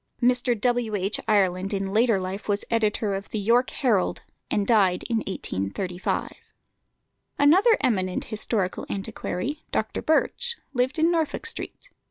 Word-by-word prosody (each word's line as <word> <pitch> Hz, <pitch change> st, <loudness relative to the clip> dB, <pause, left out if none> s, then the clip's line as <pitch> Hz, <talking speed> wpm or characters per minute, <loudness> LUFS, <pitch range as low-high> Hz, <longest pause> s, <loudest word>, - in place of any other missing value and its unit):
Mr. 245 Hz, -1 st, +2 dB
W. 240 Hz, -2 st, +1 dB
H. 195 Hz, +2 st, 0 dB
Ireland 195 Hz, -1 st, +2 dB
in 195 Hz, 0 st, -3 dB
later 225 Hz, -2 st, +3 dB
life 190 Hz, +3 st, -5 dB
was 205 Hz, 0 st, 0 dB
editor 215 Hz, -2 st, +1 dB
of 195 Hz, +1 st, -5 dB
the -, -, -3 dB
York 235 Hz, +5 st, +3 dB
Herald, 225 Hz, -10 st, 0 dB, 0.3 s
and 205 Hz, -, +1 dB
died 195 Hz, -5 st, +3 dB
in 230 Hz, -, +2 dB
1835. 180 Hz, -, -3 dB, 1.1 s
Another 375 Hz, +11 st, +5 dB
eminent 185 Hz, -6 st, 0 dB
historical 210 Hz, -3 st, -2 dB
antiquary, 195 Hz, -, -4 dB
Dr. -, -, -1 dB
Birch, 475 Hz, +9 st, +1 dB, 0.2 s
lived 255 Hz, +4 st, 0 dB
in 325 Hz, +2 st, +3 dB
Norfolk 325 Hz, -3 st, -1 dB
Street. -, -, -6 dB
215 Hz, 135 wpm, -25 LUFS, 195-250 Hz, 1.1 s, Another